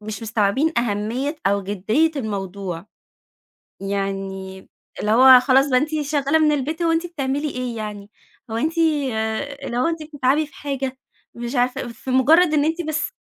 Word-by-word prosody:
مش 215 +2 -7
مستوعبين 225 +7 +1
أهمية، 235 +7 -2
أو 200 0 +2
جدّية 205 - +1
الموضوع. 195 -6 -4 0.9
يعني 195 -1 -4 0.3
اللي 210 - -1
هو 255 +2 +8
خلاص 270 +2 +3
بقى 255 - +5
أنتِ 295 - -1
شغّالة 290 +1 +1
من 305 -1 +3
البيت، 300 +4 -2
هو 330 -1 +2
أنتِ 330 +2 0
بتعملي 290 -2 -2
إيه 250 -3 -4
يعني؟ 210 -2 -6 0.4
هو 225 - -3
أنتِ 320 +7 -1 0.8
اللي 240 - -4
هو 250 - +2
أنتِ 330 -1 -2
بتتعبي 290 0 0
في 280 - -22
حاجة؟ 270 -2 -4 0.4
مش 240 +2 -5
عارفة، 245 0 0
في 235 +3 -8
مُجرّد 310 +6 +5
إن 290 -1 +3
أنتِ 325 +2 -1
بس 310 -2 -2
255 Hz, 160 wpm, -21 LUFS, 210-300 Hz, 0.9 s, هو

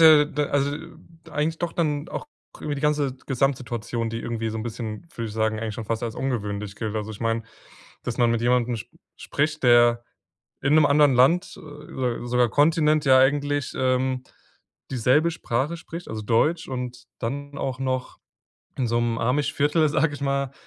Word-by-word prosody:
ja 155 -2 +8
d 150 -1 -2
also, 140 0 +1 0.6
eigentlich 160 +2 -1
doch 170 -1 -3
dann 150 -1 -1
auch - - -5 0.3
über 150 -1 -2
die 140 - -5
ganze 150 -3 +1
Gesamtsituation, 120 -3 -1
die 115 0 -4
irgendwie 115 -1 -3
so 110 - -4
'n 110 - -3
bisschen, 110 +1 -5
würde 115 -1 -4
ich 105 - -8
sagen, 110 0 0
eigentlich 110 -2 -3
schon 115 - -5
fast 115 +2 -2
als 115 -2 -3
ungewöhnlich 105 -6 -3
gilt. 110 -2 -3
Also, 110 0 -3
ich 105 - -9
meine, 115 0 0 0.6
dass 120 - -4
man 120 -1 +3
mit 115 -1 +1
jemandem 120 0 +2
sp - - -10 0.3
spricht, 150 +1 -1
der 120 -1 +5 0.6
in 145 +2 +3
'nem 155 -2 +6
anderen 145 -1 +5
Land 150 +9 +3
äh, - - -10
so 145 -5 -4
sogar 125 0 +3
Kontinent 150 +1 +3
ja 130 -1 +6
eigentlich, 145 +1 +2
ähm, 130 0 +1 0.7
dieselbe 130 +7 +3
Sprache 140 +2 -2
spricht, 170 +1 -8
also 110 -1 -5
Deutsch. 150 +10 +1
Und 125 -1 -5
dann 140 +4 -4
auch 130 -1 -3
noch 130 -1 -2 0.6
in 125 - +1
so 120 +1 +1
'nem 115 -1 0
Amish-Viertel, 145 +5 +2
sage 150 0 +1
ich 145 - -8
mal, 140 -1 0
130 Hz, 180 wpm, -24 LUFS, 115-145 Hz, 0.7 s, ja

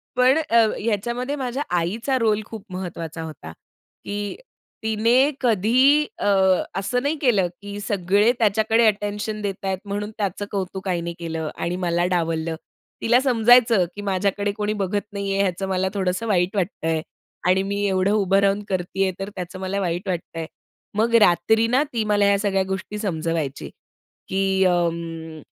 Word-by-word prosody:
पण 255 +4 +4
अ, 300 -7 -1
ह्या 225 -2 +4
ह्याच्यामध्ये 235 +5 -2
माझ्या 265 0 -3
आईचा 225 +10 0
रोल 215 -2 +2
खूप 220 -2 -9
महत्वाचा 170 -3 -5
होता. 150 - -8 0.5
की 205 0 -4 0.5
तिने 230 +6 +3
कधी 255 +6 +4
अ, - - -1 0.5
असं 245 +6 -1
नाही 295 +3 +1
केलं, 210 -9 +3
की 205 0 -7
सगळे 205 +3 +2
त्याच्याकडे 220 +2 +3
अटेन्शन 210 +1 -1
देताहेत, 195 -1 -2
म्हणून 205 +1 -4
त्याचं 205 0 -2
कौतुक 190 -1 -4
आईने 170 -1 -2
केलं 160 -2 -3
आणि 175 - -2
मला 175 0 +1
डावललं. 165 -1 -1 0.5
तिला 240 +2 +4
समजायचं, 235 -5 +5
की 205 - -6
माझ्याकडे 200 +1 0
कोणी 210 0 -1
बघत 200 +2 0
नाहीये, 200 0 0
याचं 190 +1 -2
मला 190 0 0
थोडंसं 190 +3 -1
वाईट 185 -1 +1
वाटतंय. 165 -4 -1 0.5
आणि 185 +1 +3
मी 200 +1 -2
एवढं 190 +1 +1
उभं 195 -2 +3
राहून 200 +1 +2
करतीये, 190 +1 0
तर 195 +1 -4
त्याचं 185 +1 -6
मला 190 +1 -2
वाईट 180 +1 -2
वाटतंय. 165 -2 -4 0.5
मग 230 +2 +2
रात्री 220 +6 +4
ना 260 +5 +3
ती 225 - 0
मला 205 -1 +3
ह्या 200 0 +4
सगळ्या 195 -2 +1
गोष्टी 190 +2 -4
समजवायची, 165 -7 -2 0.6
की 190 0 +1
अं, 165 -2 -1
200 Hz, 150 wpm, -23 LUFS, 180-220 Hz, 0.6 s, समजायचं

